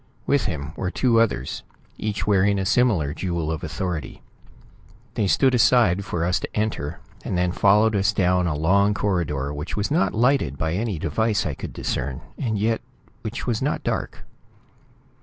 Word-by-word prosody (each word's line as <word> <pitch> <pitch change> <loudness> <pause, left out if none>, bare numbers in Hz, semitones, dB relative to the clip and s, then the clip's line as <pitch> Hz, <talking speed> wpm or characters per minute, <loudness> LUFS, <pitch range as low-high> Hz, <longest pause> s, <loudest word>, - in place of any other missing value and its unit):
With 140 -1 +2
him 75 -4 -4
were 95 - -2
two 115 +3 +2
others, 80 - -1 0.4
each 100 -4 -2
wearing 100 0 +3
a 95 - -1
similar 105 - +2
jewel 85 -3 -2
of 80 - -4
authority. 90 -5 -4 0.9
They 105 - 0
stood 130 +7 +3
aside 110 -5 +4
for 85 -3 -2
us 90 +1 +1
to - - -5
enter, 95 -7 -2 0.2
and 95 - -2
then 90 0 +1
followed 105 +4 +4
us 100 +1 +2
down 90 -3 +2
a 80 - -1
long 100 +7 +3
corridor 75 -9 -1
which 75 +7 -5
was 105 +6 -1
not 160 -4 +2
lighted 115 - +2
by 80 +3 -1
any 105 0 -1
device 110 +6 0
I 75 - -1
could - - -7
discern, 65 +2 -3
and 110 -5 -2
yet 110 +2 0 0.4
which 110 +1 -5
was 115 -3 -1
not 145 +3 -1
dark. - - -3
100 Hz, 170 wpm, -23 LUFS, 85-110 Hz, 0.9 s, aside